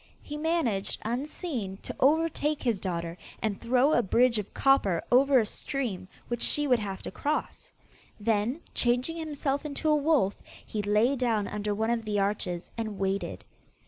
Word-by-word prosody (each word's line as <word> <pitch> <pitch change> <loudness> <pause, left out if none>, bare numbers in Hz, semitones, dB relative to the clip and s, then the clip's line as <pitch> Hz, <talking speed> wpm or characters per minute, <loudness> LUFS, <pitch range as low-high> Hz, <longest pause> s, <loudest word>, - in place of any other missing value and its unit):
He 295 - -6
managed, 300 - 0
unseen, 245 - -3
to - - -6
overtake 305 +1 +2
his 230 -7 0
daughter, 170 -2 -3 0.2
and 210 -3 -2
throw 255 +5 +3
a - - +4
bridge 235 +2 +3
of 205 - -6
copper 205 -11 +3
over 270 +2 +6
a 230 - +4
stream 215 -6 -4 0.2
which 240 -1 -3
she 295 - +3
would 250 -4 +3
have 195 -3 -5
to - - -5
cross. 305 - -3 0.5
Then, 225 +7 0
changing 250 +7 +1
himself 290 -3 -2
into 300 +1 -2
a 305 - +5
wolf, 290 -9 +2 0.2
he 210 - -3
lay 210 +6 +3
down 230 -5 0
under 210 0 -2
one 220 +2 0
of 235 -1 0
the 210 -1 0
arches, 195 -3 -2
and 215 -3 -3
waited. 195 +1 -2
235 Hz, 165 wpm, -28 LUFS, 205-285 Hz, 0.5 s, over